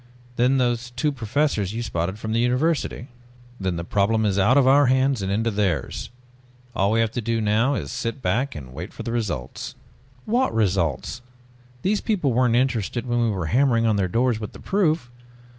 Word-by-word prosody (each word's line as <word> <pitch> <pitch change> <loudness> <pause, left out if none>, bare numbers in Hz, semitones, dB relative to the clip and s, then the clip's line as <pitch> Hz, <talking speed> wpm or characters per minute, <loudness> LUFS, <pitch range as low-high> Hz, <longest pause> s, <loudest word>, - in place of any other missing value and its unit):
Then 125 +3 +3
those 120 -1 0
two 130 +5 -1
professors 115 -4 -1
you 120 - -2
spotted 95 -2 -2
from 110 0 -5
the 115 - +2
university." 125 +1 0 0.5
"Then 95 -2 -1
the 85 - -4
problem 105 +5 +1
is 100 -1 +1
out 115 +8 +4
of 140 - +5
our 140 +1 +5
hands 130 -2 +2
and 95 0 -2
into 115 +3 0
theirs. 95 - -1 0.7
All 100 +1 +2
we 115 +1 +2
have 115 -1 0
to 120 - -3
do 115 +1 -1
now 110 +6 +2
is 70 - -4
sit 115 +4 -3
back 130 +2 -1
and 65 -4 -9
wait - - -7
for - - -7
results." 110 - -4 0.5
"What 250 +4 +1
results?! 95 - 0 0.6
These 205 +2 +1
people 175 - 0
weren't 125 -1 +3
interested 120 -2 0
when 120 -1 0
we 115 - +2
were 95 -5 -2
hammering 120 -3 +3
on 110 -2 +3
their 100 -2 +1
doors 120 +4 +1
with 105 -2 -6
the - - -11
proof. 160 -10 0
115 Hz, 190 wpm, -23 LUFS, 100-130 Hz, 0.7 s, of